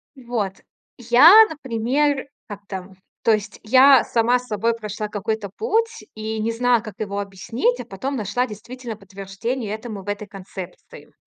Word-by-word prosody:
Вот. 235 -7 -3 0.4
Я, 285 - +8
например, 275 +1 -1 0.2
как-то 195 -2 -8 0.3
то 225 - +4
есть 210 -1 -2
я 260 +3 +7
сама 240 +2 +2
собой 230 -2 -1
прошла 210 -1 -5
какой-то 210 0 -3
путь 455 +1 0
и 220 0 -4
не 225 +2 0
знала, 240 0 +2
как 215 -4 -9
его 200 -1 -3
объяснить, 225 - -1
а - - -6
потом 270 0 -4
нашла 215 +4 -1
действительно 235 +1 -8
подтверждение 200 +4 -5
этому 220 -3 -7
в 205 - -7
этой 205 0 -4
концепции. 190 - -11
225 Hz, 145 wpm, -22 LUFS, 205-255 Hz, 0.4 s, Я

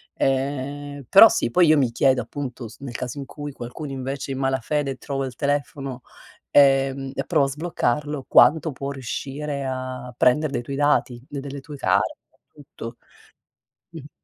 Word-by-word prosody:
Ehm, 140 +1 -2
però 210 +4 +10
sì, - - 0
poi 175 +4 +5
io 155 0 +6
mi 130 -4 +2
chiedo 130 +2 +3
appunto, 130 -4 -6
s 110 - -14
nel 130 -3 -8
caso 125 +3 -4
in 140 - -5
cui 145 +1 -7
qualcuno 135 +3 -7
invece 135 +1 -4
in 135 - -3
malafede 135 +1 -1
trova 135 +1 -3
il 130 -2 -7
telefono, 140 -2 -2 0.5
ehm, 135 -1 +4
e - - -2
prova 140 - +3
a - - -4
sbloccarlo, 150 -2 -2
quanto 160 0 +5
può 140 +1 -5
riuscire 140 +2 -4
a 130 -1 -5
prender 140 +5 +3
dei 125 - -1
tuoi 135 +3 -6
dati, 145 -3 +1
de 145 - -6
delle 140 0 -7
tue 145 0 -9
card, 100 -4 +1 0.4
tutto. 120 -5 -10 0.9
Mh. 150 -3 -10
135 Hz, 165 wpm, -23 LUFS, 130-145 Hz, 0.9 s, però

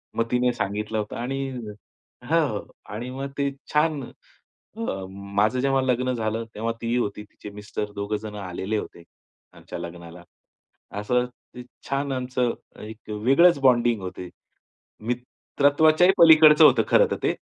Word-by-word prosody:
मग 115 - +1
तिने 125 0 +2
सांगितलं 105 0 -3
होतं 105 - -5
आणि 135 +3 -3 0.7
हां, - - +2
हो. - - -5 0.3
आणि 120 +4 -5
मग 135 +1 -5
ते 140 0 0 0.2
छान 150 -2 +1 0.7
अ, - - -6 0.3
माझं 100 +4 -1
जेव्हा 135 0 +2
लग्न 125 0 0
झालं, 115 -1 -2
तेव्हा 115 +2 -2
तीही 115 +1 -1
होती 105 -3 -2
तिचे 105 0 -12
मिस्टर 105 0 -6
दोघे 100 +1 -2
जण 105 -1 -8
आलेले 100 +2 -4
होते, 85 -4 -7 0.5
आमच्या - - -9
लग्नाला. 85 0 -9 0.8
असं 125 +4 +1 0.3
ते 125 - -8 0.3
छान 140 0 -1
आमचं 125 -2 -1 0.3
एक 110 +1 -11
वेगळंच 135 +10 +4
बॉन्डिंग 120 -4 +3
होती. 90 -1 -7 0.8
मित्रत्वाच्याही 145 +7 +2
पलीकडचं 155 -2 +8
होतं 125 -6 +5
खरं - - +5
तर - - +1
ते. - - +1
120 Hz, 140 wpm, -24 LUFS, 105-135 Hz, 0.8 s, पलीकडचं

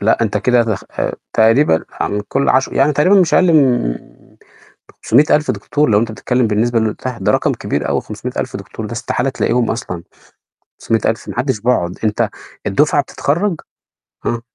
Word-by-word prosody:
لأ، 110 +3 +2
أنت 110 -2 0
كده 120 +3 +3
دخ 110 -4 -3
آآ - - -3 0.2
تقريبًا 110 - +3
عن 105 0 -2
كل 140 +1 0
عش 130 +1 +3
يعني 140 +3 +2
تقريبًا 185 +8 +4
مش 170 - +2
أقل 180 -2 +4
من 125 - +3 1.1
500.000 150 +4 +3
دكتور 150 -3 -1
لو 105 -1 +4
أنت 115 0 -2
بتتكلم 125 +2 0
بالنسبة 115 +3 +1
اللي 110 -1 +1
قُلتها، 125 +3 -6
ده - - +2
رقم - - +1
كبير - - -3
أوي - - 0
500.000 - - -5
دكتور 110 - -8
ده 105 - -8
استحالة 120 +2 -1
تلاقيهم 125 -2 0
أصلًا 90 -7 -5 0.8
500.000 115 0 -1
ما - - -6
حدش 130 -3 0
بيقعد. 100 -7 0
أنت 105 -1 +1 0.4
الدفعة 145 +7 +2
بتتخرج 170 +6 -1 0.6
آه. 120 -1 -1
120 Hz, 165 wpm, -17 LUFS, 110-140 Hz, 1.1 s, تقريبًا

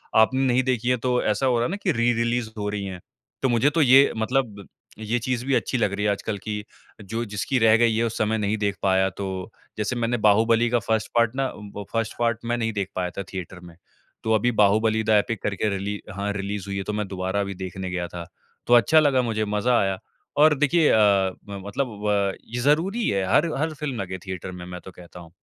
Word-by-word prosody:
आपने 120 +4 +4
नहीं 130 0 +2
देखी 125 -2 0
है 125 - +3
तो 125 0 +2
ऐसा 110 +5 0
हो 125 -2 +3
रहा 120 - +1
है - - -1
ना 200 - -2
कि 185 - +2
री-रिलीज़ 120 -2 0
हो 105 -1 -3
रही 105 -1 -3
हैं। 95 -2 -6 0.4
तो 130 - +2
मुझे 120 +4 +3
तो 160 +2 +1
ये 135 0 +6
मतलब 110 -3 -1 0.3
ये 110 +2 -1
चीज़ 125 +1 -2
भी 135 - 0
अच्छी 130 - 0
लग 105 -4 0
रही 105 +1 -2
है 105 - +3
आजकल 100 +1 -3
कि 105 +1 -5 0.4
जो 115 +4 -4
जिसकी 105 +5 -2
रह 110 -1 +5
गई 115 -1 +3
है 115 - +1
उस 115 - -3
समय 110 +1 +1
नहीं 105 0 -1
देख 100 -2 -1
पाया, 95 0 +3
तो 95 +1 -6 0.3
जैसे 110 +3 -1
मैंने 120 0 0
बाहुबली 115 +3 +4
का 120 +1 +2
फर्स्ट 110 0 -1
पार्ट 115 0 +3
ना 135 0 0
उम, 105 -1 -10
वो 100 0 -6
1st 115 -1 -1
पार्ट 115 -1 +1
मैं 120 +1 0
नहीं 115 -1 -1
देख 100 -2 -2
पाया 90 -1 -1
था 100 - -2
थिएटर 90 -1 -6
में, 85 -2 -14 0.5
तो 110 - +1
अभी 120 +3 +2
बाहुबली 110 +2 +2
द 110 - -4
एपिक 110 0 +2
करके 105 +1 -1
रिली 100 +1 -4 0.2
हाँ 100 +1 -2
रिलीज़ 100 0 -4
हुई 100 - -3
है 95 - -2
तो 105 - -4
मैं 105 -1 -2
दोबारा 95 +1 -2
अभी 100 0 -3
देखने 95 0 -5
गया 90 -1 -2
था। 85 0 -8 0.4
तो 120 - +4
अच्छा 120 +7 +6
लगा 140 -4 +3
मुझे 110 -3 -1
मज़ा 105 +4 +1
आया 95 -1 0 0.4
और 150 +1 +6
देखिए 150 +3 +3
अ - - +4
अ, 100 -3 +3 0.2
मतलब 100 +7 -3 0.2
व 100 -2 +1 0.2
ये - - -1
ज़रूरी 170 - +1
है 100 -1 0
हर 160 +1 +3
हर 160 +3 -1
फिल्म 140 -5 -4
लगे 95 -1 -5
थिएटर 95 -1 -5
में 90 -1 -8
मैं 90 0 -7
तो 95 - -11
कहता 90 -1 -13
हूँ 85 -2 -13
110 Hz, 240 wpm, -24 LUFS, 100-120 Hz, 0.5 s, ये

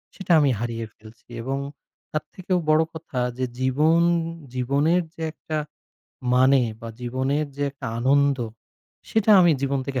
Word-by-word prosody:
সেটা 190 -2 -4
আমি 145 -2 +4
হারিয়ে 115 -1 -3
ফেলছি 110 +2 -17
এবং 135 +2 -2 0.5
তার 155 - -2
থেকেও 185 0 -1
বড় 155 +1 +5
কথা 160 -5 -5 0.2
যে 130 - 0
জীবন 150 +6 +3 0.5
জীবনের, 140 +8 +2
যে 165 - -10
একটা 155 -1 -5 0.8
মানে 130 +1 +5 0.2
বা 115 - -7
জীবনের 130 +5 -1
যে 145 - -2
একটা 140 - -8
আনন্দ 140 +1 +3 0.7
সেটা 220 -1 +2
আমি 175 -2 +6
জীবন 140 0 0
থেকে 135 -2 -2
140 Hz, 145 wpm, -24 LUFS, 130-160 Hz, 0.8 s, আমি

